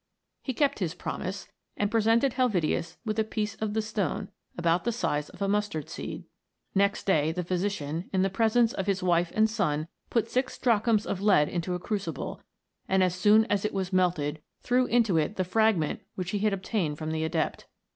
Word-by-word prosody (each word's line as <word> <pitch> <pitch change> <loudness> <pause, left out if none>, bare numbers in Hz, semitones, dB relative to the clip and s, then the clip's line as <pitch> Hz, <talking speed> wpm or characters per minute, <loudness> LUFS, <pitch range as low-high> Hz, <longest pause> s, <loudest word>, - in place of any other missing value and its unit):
He 260 - -4
kept 285 -3 +1
his 180 -3 -2
promise, 190 +2 -5 0.3
and 205 0 0
presented 230 +3 +3
Helvetius 175 - 0
with 215 0 -1
a - - +4
piece 215 -1 -3
of 215 -1 -3
the 220 - +1
stone 210 -6 -2 0.3
about 170 0 +2
the 235 - 0
size 150 -10 -1
of - - -6
a - - +1
mustard 205 -7 -1
seed. - - -6 0.5
Next 200 +1 +1
day 160 -5 +3
the 180 +2 -3
physician, 175 -3 -2
in 190 -1 +2
the 195 - +2
presence 225 +3 +3
of 195 - -3
his 195 -1 0
wife 175 -1 +2
and 215 0 +5
son, 165 -9 -1 0.2
put 230 -2 +1
six 255 +2 -1
drachms 225 -2 +2
of 195 - -3
lead 195 -8 +4
into 180 +1 -2
a - - -3
crucible, 180 -7 -4 0.5
and 190 0 +4
as 180 -2 +2
soon 210 +4 +5
as 205 -3 0
it 210 - -2
was 190 -1 -2
melted, 160 -5 +1 0.2
threw 250 0 +2
into 230 -7 +3
it 160 +6 0
the 185 - 0
fragment 190 -4 +1
which 180 -1 -3
he 205 - -1
had 215 +1 +2
obtained 190 -5 -1
from 155 0 -4
the 160 0 -1
adept. 160 - -2
195 Hz, 195 wpm, -28 LUFS, 175-220 Hz, 0.5 s, and